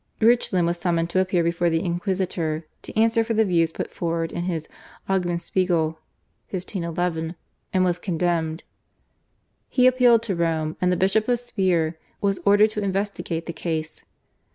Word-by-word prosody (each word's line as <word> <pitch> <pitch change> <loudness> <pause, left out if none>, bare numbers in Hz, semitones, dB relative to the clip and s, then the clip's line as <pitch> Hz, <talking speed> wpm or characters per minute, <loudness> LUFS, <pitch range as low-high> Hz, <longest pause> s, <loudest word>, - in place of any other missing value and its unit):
Reuchlin 220 -6 +3
was 170 0 0
summoned 170 -1 0
to 185 - +2
appear 185 -2 +2
before 170 +1 +1
the 165 0 +1
Inquisitor 175 -3 -1 0.2
to - - -9
answer 225 0 +4
for 225 0 -2
the 220 0 +4
views 165 -4 +2
put - - -5
forward 165 -1 -2
in 175 - -3
his 165 -4 -3 0.4
/Augenspeigel/ 175 -2 +1 0.6
(1511), 175 -3 -3 0.4
and 185 -1 +2
was 180 -1 0
condemned. 170 -2 -1 1.1
He 250 - +3
appealed 250 -3 +5
to 205 -5 -2
Rome, 160 -2 0
and 180 0 +3
the 180 - +1
Bishop 195 +4 +2
of 245 -1 +3
Speier 185 -9 0 0.2
was 200 -1 0
ordered 205 +2 +6
to 210 - -3
investigate 195 -4 -2
the 170 - -5
case. 160 -2 -4
180 Hz, 155 wpm, -24 LUFS, 165-200 Hz, 1.1 s, ordered